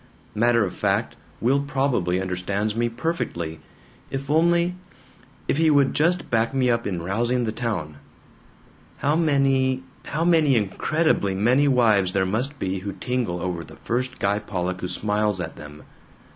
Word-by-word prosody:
Matter 115 0 +3
of 90 - -5
fact, - - 0 0.3
Will 130 +4 +3
probably 135 -11 0
understands 95 +3 -2
me 120 +1 +1
perfectly! 115 - -3 0.5
If 140 +1 -4
only 170 +2 +3 0.7
if - - +1
he 160 0 +4
would 140 -3 +4
just 170 +4 +1
back 115 +3 +1
me 130 -2 +3
up 115 0 0
in 90 -4 -3
rousing 120 +7 0
the 110 - -1
town. 105 -11 -3 1.0
"How 145 +2 +1
many, 135 -4 +2 0.2
how 160 +2 -2
incredibly 150 - +2
many 125 +8 +3
wives 110 -8 +3
there 95 -1 +2
must 125 +9 -2
be 95 -4 -2
who 100 +1 -5
tingle 125 -9 -2
over 90 -2 -3
the - - -13
first 125 +2 -3
Guy 100 +1 +1
Pollock 95 -3 -3
who 90 - -2
smiles 105 +2 0
at 85 -2 -5
them. 75 0 -11
115 Hz, 150 wpm, -24 LUFS, 95-140 Hz, 1.0 s, he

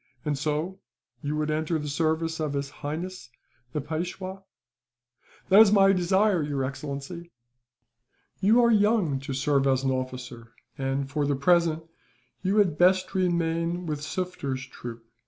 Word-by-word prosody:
"And 150 -1 0
so, 155 +6 -2 0.4
you 145 +1 -2
would 155 0 -1
enter 155 +2 0
the 150 -1 -5
service 160 +2 0
of 155 -2 -2
His 140 0 -3
Highness, 155 0 -6 0.4
the 150 - -2
Peishwa?" 180 +5 -5 1.1
"That 195 +3 +8
is 215 -3 +7
my 195 -1 +6
desire, 190 +1 +2
your 145 -2 -2
excellency." 140 +5 -6 1.1
"You 220 +5 +5
are 235 - +5
young 205 -9 +3
to 135 0 -5
serve 140 0 +2
as 135 0 +2
an 135 - +1
officer 125 -3 -5 0.2
and, 135 0 -2
for 145 +1 -1
the 145 - +1
present, 165 +2 +2 0.6
you 195 +2 0
had 185 -8 +3
best 185 +1 +4
remain 170 -1 0
with 150 -3 -3
Sufder's 150 -6 -3
troop. 120 -3 -9
155 Hz, 145 wpm, -26 LUFS, 140-180 Hz, 1.1 s, That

